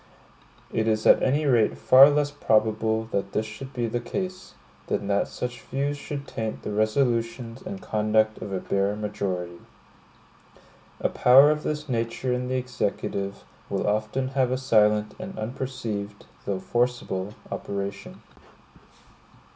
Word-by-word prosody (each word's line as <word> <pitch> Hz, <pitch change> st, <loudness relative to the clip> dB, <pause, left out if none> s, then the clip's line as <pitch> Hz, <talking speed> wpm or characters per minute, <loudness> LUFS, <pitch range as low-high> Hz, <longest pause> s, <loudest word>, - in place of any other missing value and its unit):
It 110 Hz, 0 st, 0 dB
is 110 Hz, -1 st, +1 dB
at -, -, +7 dB
any 145 Hz, +4 st, +2 dB
rate 120 Hz, -6 st, +3 dB
far 135 Hz, +2 st, +8 dB
less 145 Hz, 0 st, +1 dB
probable 110 Hz, -4 st, +1 dB
that 100 Hz, 0 st, -2 dB
this 110 Hz, -, 0 dB
should 110 Hz, +5 st, -8 dB
be 120 Hz, -3 st, -2 dB
the 115 Hz, +1 st, -1 dB
case, 185 Hz, +9 st, -5 dB, 0.3 s
than 100 Hz, -, -1 dB
that 100 Hz, 0 st, +2 dB
such 125 Hz, 0 st, -5 dB
views 140 Hz, +2 st, -2 dB
should 145 Hz, 0 st, -6 dB
taint 110 Hz, -1 st, -4 dB
the -, -, -4 dB
resolutions 115 Hz, +2 st, 0 dB
and 190 Hz, +1 st, -6 dB
conduct 110 Hz, 0 st, +1 dB
of 100 Hz, -, -6 dB
a 95 Hz, -, -1 dB
bare 100 Hz, +2 st, 0 dB
majority. 95 Hz, -5 st, -3 dB, 1.4 s
A -, -, +3 dB
power 135 Hz, +4 st, +7 dB
of 150 Hz, 0 st, -1 dB
this 150 Hz, 0 st, -3 dB
nature 120 Hz, +1 st, -1 dB
in 125 Hz, 0 st, -2 dB
the 130 Hz, -, -1 dB
Executive, 100 Hz, -5 st, -3 dB, 0.3 s
will -, -, -1 dB
often 110 Hz, +5 st, 0 dB
have 130 Hz, -2 st, +1 dB
a 130 Hz, -, 0 dB
silent 105 Hz, -4 st, +3 dB
and 185 Hz, +1 st, -7 dB
unperceived, 110 Hz, -4 st, -5 dB, 0.2 s
though 95 Hz, -2 st, -1 dB
forcible, 115 Hz, -3 st, -1 dB, 0.2 s
operation. 100 Hz, 0 st, -5 dB
115 Hz, 140 wpm, -25 LUFS, 105-130 Hz, 1.4 s, far